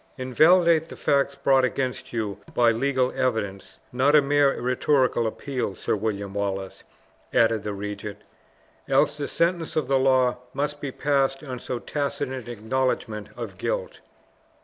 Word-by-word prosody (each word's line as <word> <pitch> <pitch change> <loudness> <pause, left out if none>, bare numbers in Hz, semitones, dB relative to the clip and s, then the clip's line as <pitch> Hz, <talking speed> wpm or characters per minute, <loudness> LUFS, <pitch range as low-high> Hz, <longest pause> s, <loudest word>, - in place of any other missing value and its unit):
"Invalidate 160 +6 +4
the - - -9
facts 140 0 +1
brought 135 -1 +3
against 130 +1 -2
you 105 -4 -3 0.2
by 120 -1 +5
legal 130 +2 +1
evidence, 105 -6 -2 0.2
not 135 +4 +3
a 150 - +8
mere 145 0 +3
rhetorical 125 -1 +2
appeal, 125 -3 -3
Sir - - -1
William 100 -2 -3
Wallace," 95 -2 -3 0.5
added 115 -2 +3
the 105 0 -4
regent, 105 0 -6 0.7
"else 145 - +3
the 145 -1 -4
sentence 170 -1 0
of 155 -5 0
the 135 0 +3
law 130 -2 +3 0.2
must 145 +1 -2
be 140 - -3
passed 135 -1 0
on 130 -4 -6
so 125 - -4
tacit 140 +1 -3
an 130 -3 -6
acknowledgment 110 -2 -2
of - - -7
guilt." - - -3
130 Hz, 150 wpm, -25 LUFS, 110-140 Hz, 0.7 s, a